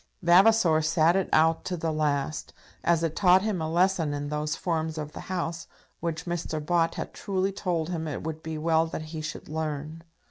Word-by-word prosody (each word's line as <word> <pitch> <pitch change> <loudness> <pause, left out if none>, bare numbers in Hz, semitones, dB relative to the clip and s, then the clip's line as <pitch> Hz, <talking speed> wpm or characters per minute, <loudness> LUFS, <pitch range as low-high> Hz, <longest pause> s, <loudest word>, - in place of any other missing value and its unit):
Vavasor 175 -2 +5
sat 160 +2 +3
it 195 - 0
out 160 +1 +3
to 180 - -2
the 160 -1 -1
last, 150 -1 -1 0.3
as 170 -1 +2
it 160 -1 -1
taught 185 -1 +5
him 210 -6 -1
a 160 - -2
lesson 170 -3 +2
in 145 0 -4
those 150 +1 -2
forms 160 -2 -2
of 150 -1 -5
the - - -7
House 170 -2 -3 0.3
which 165 -1 -3
Mr. 175 -2 -3
Bott 165 +1 +1
had - - -5
truly 195 -1 -1
told 175 -4 -2
him 165 -3 -3
it 145 - -4
would 160 0 -5
be 160 -1 -5
well 160 +1 +2
that 160 - -5
he 160 - -4
should 155 0 -6
learn. 155 0 -4
160 Hz, 200 wpm, -27 LUFS, 155-175 Hz, 0.3 s, Vavasor